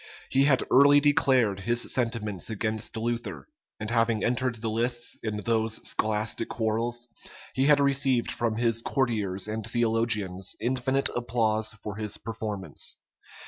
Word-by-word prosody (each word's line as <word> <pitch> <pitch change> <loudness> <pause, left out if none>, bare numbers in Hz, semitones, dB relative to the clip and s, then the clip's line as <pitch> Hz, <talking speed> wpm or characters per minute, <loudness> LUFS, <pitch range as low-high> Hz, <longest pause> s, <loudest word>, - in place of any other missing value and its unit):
He 135 +1 +4
had 135 -3 +3
early 140 +2 +7
declared 130 -8 +3
his 120 +4 0
sentiments 115 -6 -2
against 110 0 -3
Luther; 110 - -3 0.3
and 110 +1 -4
having 115 -2 +1
entered 125 0 0
the 115 0 -5
lists 120 +2 +1
in 110 -2 -3
those 115 -1 +1
scholastic 110 +1 -1
quarrels, 115 +2 -2 0.5
he 135 +2 +1
had 150 -1 +6
received 135 -3 +2
from 115 -2 -1
his 115 0 +2
courtiers 105 -8 -1
and 110 +1 -4
theologians 115 -4 0
infinite 130 +3 0
applause 110 -3 0
for 105 -1 -6
his 105 -1 -1
performance. 105 -7 -4
115 Hz, 135 wpm, -27 LUFS, 110-120 Hz, 0.5 s, early